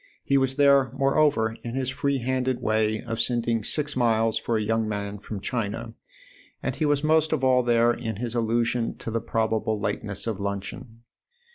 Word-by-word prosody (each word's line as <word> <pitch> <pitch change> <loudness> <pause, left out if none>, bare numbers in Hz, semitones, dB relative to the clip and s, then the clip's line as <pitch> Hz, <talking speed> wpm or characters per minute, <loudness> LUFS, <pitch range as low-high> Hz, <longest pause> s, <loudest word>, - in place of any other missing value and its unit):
He 140 - +1
was 135 -1 +2
there 140 -2 +4
moreover 135 -5 +2
in 120 +1 -5
his 130 -1 -1
free 140 +1 0
handed 130 0 -1
way 110 0 0
of 115 -2 -3
sending 120 -2 0
six 145 +5 0
miles 115 -2 +2
for 115 - 0
a - - -1
young 110 0 0
man 100 -1 -4
from 105 0 -6
China, 115 +1 -3 0.7
and - - -2
he 155 - 0
was 145 0 +1
most 155 0 +3
of 155 -4 0
all 130 -1 +4
there 120 -1 +3
in 115 -3 -4
his 120 +2 -4
allusion 115 0 0
to 115 - -6
the 115 0 -1
probable 110 -1 -1
lateness 100 0 -2
of 110 -4 -3
luncheon. 100 +4 -5
115 Hz, 180 wpm, -25 LUFS, 110-130 Hz, 0.7 s, there